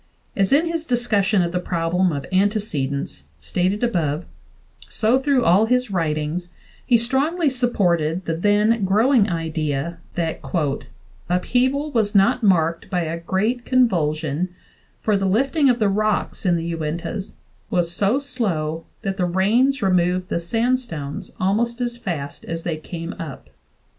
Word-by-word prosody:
As 195 +2 +1
in 295 +5 +4
his 330 -1 -3
discussion 215 -6 +2
of 170 - -2
the 180 - -1
problem 180 +1 0
of 140 -2 -4
antecedence, 185 -9 -1 0.2
stated 185 +5 -1
above, 170 -8 0 0.6
so 230 +4 +2
through 270 -2 +2
all 195 +6 +5
his 250 -1 +1
writings, 165 0 -1 0.3
he 240 - +4
strongly 275 +7 +1
supported 180 -9 0
the 165 - -1
then 210 +4 +2
growing 215 +3 +3
idea 160 -1 -2 0.2
that 165 -2 -2 0.9
"upheaval 260 +11 +1
was 215 -5 0
not 195 +5 +4
marked 170 -5 +2
by 180 -3 0
a 165 0 -3
great 210 +8 -1
convulsion, 170 - +1 0.5
for 215 - +2
the 195 -1 +1
lifting 270 - +2
of 245 - +3
the 215 -3 +2
rocks 210 0 0
[in 175 - +4
the 170 0 -2
Uintas] 170 +6 -4 0.3
was 175 -2 0
so 200 +7 +2
slow 170 - -2 0.2
that 195 -1 -2
the 180 - +1
rains 225 +9 +2
removed 180 -1 +1
the - - 0
sandstones 225 - -2
almost 230 +6 0
as 240 -1 -2
fast 165 -11 -5
as 165 0 -4
they 165 - -1
came 165 +3 -6
up." 155 -6 -8
190 Hz, 145 wpm, -22 LUFS, 165-235 Hz, 0.9 s, all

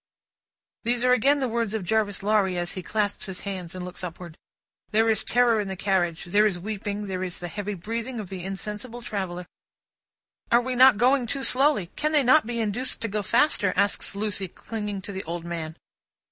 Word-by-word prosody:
These 240 +1 +1
are 250 - +5
again 275 +4 +3
the 260 - +1
words 230 -2 -1
of 215 - -2
Jarvis 205 +1 0
Lorry, 200 -3 +2
as 175 0 -1
he 185 - -5
clasps 210 +3 -2
his 190 -1 -5
hands, 185 -4 -5
and 180 -1 -5
looks 180 +1 -8
upward. 175 -1 -7 0.5
There 225 +1 +3
is 220 -1 +1
terror 240 -2 +3
in 205 - -2
the 190 - -4
carriage, 180 -3 0
there 205 +5 +4
is 190 -4 -1
weeping, 205 +2 -4
there 185 -2 -3
is 180 -1 -4
the 175 - -5
heavy 205 +4 -4
breathing 230 +6 -4
of 200 -4 -6
the 185 -2 -6
insensible 210 +5 -5
traveller. 185 -5 -4 1.1
"Are 235 - +6
we 255 +1 -2
not 255 -2 +7
going 250 +2 +3
too 270 +3 -2
slowly? 260 - +3
Can 305 +1 -1
they 295 -2 +5
not 260 +1 +5
be 240 -1 -3
induced 225 +4 -1
to 225 - -1
go 210 0 -2
faster?" 205 -3 +3
asks 200 0 0
Lucie, 200 -2 -1
clinging 210 +1 -5
to 200 - -6
the 190 0 -5
old 170 +1 -5
man. 165 -1 -5
205 Hz, 200 wpm, -25 LUFS, 185-235 Hz, 1.1 s, not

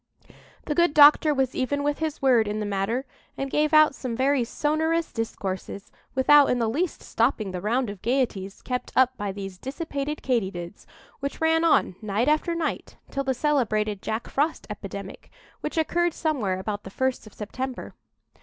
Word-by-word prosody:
The 300 - -1
good 340 0 +2
doctor 300 +1 +7
was 265 -3 0
even 285 +2 -1
with 290 0 0
his 315 -3 -3
word 240 -5 +4
in 210 +1 -2
the 210 - -2
matter, 205 +6 -1 0.3
and 275 0 -3
gave 300 +1 +2
out 310 -2 +6
some 255 -4 -4
very 265 +1 +2
sonorous 315 +6 0
discourses, 200 -3 -5 0.2
without 285 +2 +6
in 250 - +2
the 230 -2 +1
least 315 +10 -2
stopping 225 -4 0
the 180 -1 -5
round 240 +5 0
of 200 -2 -7
gaieties 230 -6 -1
kept 250 -1 -3
up 260 0 +4
by 205 -3 -3
these 195 -2 -7
dissipated 285 - -4
Katy 235 -7 +1
dids, 175 0 -9 0.3
which 280 0 -4
ran 325 0 +3
on, 320 - +3
night 215 +4 0
after 310 +3 +2
night, 335 -1 -3
till 275 - -1
the 265 -1 0
celebrated 215 -8 0
Jack 220 +2 -3
Frost 300 +4 -1
epidemic, 200 -1 -8 0.3
which - - -5
occurred 345 +1 +1
somewhere 250 - -1
about 205 +2 -4
the - - -8
first 260 +2 -2
of 215 - -14
September. 255 +4 -5
260 Hz, 175 wpm, -25 LUFS, 210-295 Hz, 0.3 s, doctor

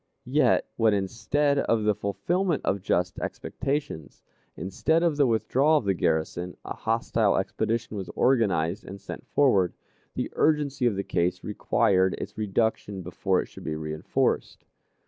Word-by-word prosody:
Yet, - - +3
when 110 -2 +4
instead 130 +9 0
of 115 -5 +1
the 105 0 +3
fulfillment 170 - -1
of 100 - 0
just 90 -1 0
expectations, 135 - -4 0.3
instead 160 - 0
of 165 -3 +2
the 145 -2 +3
withdrawal 125 +7 +3
of 125 - -2
the 100 - +2
garrison, 85 +1 -1
a - - -4
hostile - - +1
expedition 115 -1 -2
was 95 -3 -5
organized 105 -7 +2
and 100 +1 -9
sent - - -9
forward, 100 -11 +3 0.4
the - - -3
urgency 145 -4 +2
of 110 - 0
the 100 - -2
case 90 0 -1
required 95 -2 +2
its - - -7
reduction 105 -2 -1
before 90 +2 0
it - - -11
should - - -13
be 80 - -3
reënforced. 75 0 -1
105 Hz, 145 wpm, -26 LUFS, 95-135 Hz, 0.4 s, when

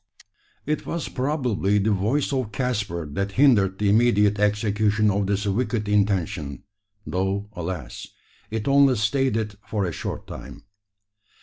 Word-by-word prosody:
It 150 +1 -2
was 170 -1 -3
probably 125 -8 0
the 105 +2 +2
voice 115 +9 0
of 130 -5 -1
Caspar 105 - -2
that 100 +5 -2
hindered 105 -8 +4
the 105 - 0
immediate 105 -2 +3
execution 105 +1 +2
of 100 0 0
this 100 +1 0
wicked 105 +1 -1
intention; 95 -9 0 0.4
though, 95 +2 -2
alas! 85 -7 -6 0.4
it 110 +1 -3
only 140 -1 +5
stayed 120 +3 +1
it 105 -2 -2
for 105 -3 -1
a 85 - -2
short - - -5
time. 70 +2 -10
105 Hz, 135 wpm, -24 LUFS, 100-120 Hz, 0.4 s, only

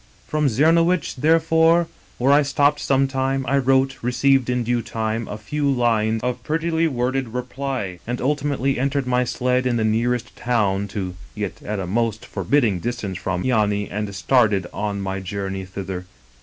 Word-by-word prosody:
" - - -31
From 150 -1 +1
Czemowicz, 165 +6 +3
therefore, 165 +3 +4 0.3
where 135 +3 +3
I 145 - +6
stopped 145 +1 +2
some 135 -1 +2
time, 135 0 -1
I 140 0 +3
wrote, 135 +1 +2
received 130 +1 +2
in 125 -1 0
due 120 +1 0
time 110 0 -3
a 105 - -5
few 140 +7 -2
lines 115 -4 +1
of 125 0 -2
prettily 165 +1 0
worded 125 -3 -2
reply, 125 -7 -4
and 120 +1 -2
ultimately 140 -1 0
entered 140 +1 0
my 125 0 +1
sled 125 +1 0
in 120 -1 +1
the 110 - 0
nearest 120 +3 0
town 100 -5 0
to, 95 -2 -4 0.2
yet 105 -1 -5
at 105 0 -4
a 95 - -3
most 110 +3 -1
forbidding 115 -10 +1
distance 110 -4 -4
from, 90 -1 -2
Yany, 105 -5 +1
and 105 -1 -3
started 105 -4 +2
on 100 -1 -3
my 95 0 -3
journey 95 0 -4
thither. 95 -1 -6
125 Hz, 170 wpm, -22 LUFS, 105-135 Hz, 0.3 s, I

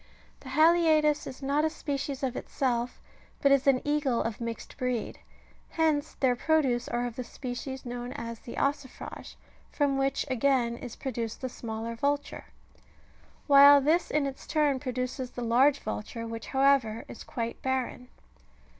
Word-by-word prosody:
The 265 - -11
haliaetus 310 0 +4
^^ - - -7
is 265 - -9
not 285 +2 +1
a 315 - +2
species 280 -3 -4
of 260 -2 -1
itself, 245 -2 -2 0.4
but 280 - +3
is 275 0 +3
an 265 -2 +4
eagle 290 -5 +1
of 225 0 -4
mixed 230 -1 -6
breed: 250 -3 -2 0.5
hence 315 -2 0
their 255 -2 +2
produce 260 -4 +1
are 240 +1 -1
of 240 -1 -6
the 250 - -3
species 260 +2 -6
known 245 0 -5
as 230 -1 -6
the 235 - -9
ossifi 280 -2 -3
age, - - -12 0.3
from 280 -2 +1
which 270 0 0
again 255 -2 +1
is 235 -1 -8
produced 235 -4 -4
the 260 - -3
smaller 225 -1 -5
vulture; 285 +4 -2 1.0
while 285 0 +9
this 315 +5 +2
in 300 -1 +1
its 275 -1 -6
turn 295 -4 +2
produces 255 0 -3
the 245 - -6
large 260 +5 +4
vulture, 215 0 -5
which, 230 0 -6
however, 265 -5 +2
is - - -9
quite 230 -1 -5
barren. 260 -1 -2
260 Hz, 160 wpm, -28 LUFS, 240-285 Hz, 1.0 s, while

